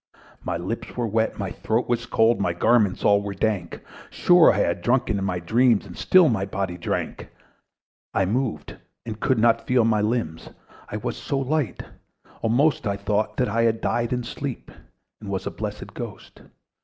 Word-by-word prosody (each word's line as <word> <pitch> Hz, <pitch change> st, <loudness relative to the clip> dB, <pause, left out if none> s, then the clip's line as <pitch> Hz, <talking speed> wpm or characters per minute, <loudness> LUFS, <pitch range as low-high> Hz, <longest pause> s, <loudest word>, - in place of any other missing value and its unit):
My -, -, -2 dB
lips 95 Hz, +10 st, -5 dB
were 120 Hz, -, 0 dB
wet, 110 Hz, +1 st, 0 dB
my 100 Hz, -3 st, -4 dB
throat 110 Hz, +6 st, -1 dB
was 120 Hz, -1 st, -1 dB
cold, 115 Hz, -1 st, +3 dB
My 90 Hz, -3 st, 0 dB
garments 105 Hz, +2 st, +2 dB
all 100 Hz, 0 st, +5 dB
were 100 Hz, -1 st, -5 dB
dank; 95 Hz, -4 st, -2 dB, 0.3 s
Sure 175 Hz, -2 st, +5 dB
I -, -, -1 dB
had 85 Hz, -3 st, 0 dB
drunken 120 Hz, -2 st, +1 dB
in 95 Hz, -, -2 dB
my 90 Hz, -2 st, -1 dB
dreams, 115 Hz, +5 st, +2 dB
And 90 Hz, -3 st, -11 dB
still 185 Hz, -3 st, +5 dB
my 110 Hz, -8 st, 0 dB
body 95 Hz, -2 st, -3 dB
drank. 90 Hz, -, -4 dB, 0.8 s
I 95 Hz, -, +1 dB
moved, 110 Hz, -, -2 dB, 0.3 s
and 110 Hz, -2 st, -6 dB
could 130 Hz, +1 st, +1 dB
not 115 Hz, +1 st, +2 dB
feel 125 Hz, -2 st, +3 dB
my 110 Hz, -2 st, +2 dB
limbs: 105 Hz, -8 st, -2 dB, 0.4 s
I 105 Hz, -, -4 dB
was 115 Hz, +3 st, -4 dB
so 140 Hz, -, -3 dB
light 135 Hz, -, -1 dB, 0.6 s
almost 125 Hz, +2 st, +2 dB
I 100 Hz, 0 st, -1 dB
thought 105 Hz, +1 st, -1 dB
that 125 Hz, -, +1 dB
I 115 Hz, -, +1 dB
had 115 Hz, -1 st, +2 dB
died 120 Hz, -1 st, -1 dB
in 125 Hz, -1 st, -1 dB
sleep, 135 Hz, +2 st, -6 dB, 0.5 s
And 105 Hz, -, -9 dB
was 95 Hz, -1 st, -3 dB
a -, -, -3 dB
blessed -, -, -6 dB
ghost. -, -, -9 dB
110 Hz, 180 wpm, -24 LUFS, 100-120 Hz, 0.8 s, all